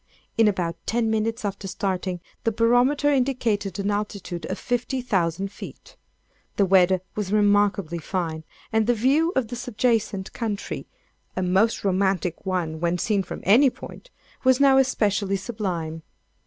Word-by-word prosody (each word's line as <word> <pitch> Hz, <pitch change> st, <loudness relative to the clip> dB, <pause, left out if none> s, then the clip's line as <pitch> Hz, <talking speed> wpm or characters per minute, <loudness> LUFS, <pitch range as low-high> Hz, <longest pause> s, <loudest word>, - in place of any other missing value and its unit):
In 225 Hz, -1 st, +4 dB
about 175 Hz, -4 st, -1 dB
ten 225 Hz, -1 st, +1 dB
minutes 225 Hz, +1 st, -1 dB
after 195 Hz, 0 st, -4 dB
starting, 185 Hz, -2 st, -2 dB, 0.2 s
the 225 Hz, -, +1 dB
barometer 245 Hz, +6 st, +3 dB
indicated 240 Hz, -8 st, 0 dB
an 200 Hz, +1 st, -1 dB
altitude 200 Hz, -5 st, -4 dB
of -, -, -3 dB
15,000 200 Hz, -8 st, -1 dB
feet. -, -, -11 dB, 0.6 s
The 200 Hz, -, +3 dB
weather 185 Hz, -1 st, +4 dB
was 205 Hz, -2 st, -3 dB
remarkably 205 Hz, -4 st, +2 dB
fine, 160 Hz, -2 st, -3 dB, 0.3 s
and 220 Hz, 0 st, +2 dB
the 245 Hz, -, +3 dB
view 280 Hz, +9 st, +2 dB
of 250 Hz, -4 st, 0 dB
the 245 Hz, -, -4 dB
subjacent 225 Hz, -5 st, -1 dB
country—a 205 Hz, -3 st, -6 dB
most 190 Hz, +5 st, +2 dB
romantic 190 Hz, -2 st, 0 dB
one 170 Hz, -4 st, -1 dB
when 170 Hz, +1 st, 0 dB
seen 205 Hz, +2 st, +1 dB
from 185 Hz, -, -7 dB
any 245 Hz, +8 st, +6 dB
point,—was 260 Hz, -, -3 dB
now 270 Hz, -1 st, +6 dB
especially 210 Hz, -6 st, +1 dB
sublime. 185 Hz, -7 st, -4 dB
205 Hz, 135 wpm, -24 LUFS, 185-235 Hz, 0.6 s, any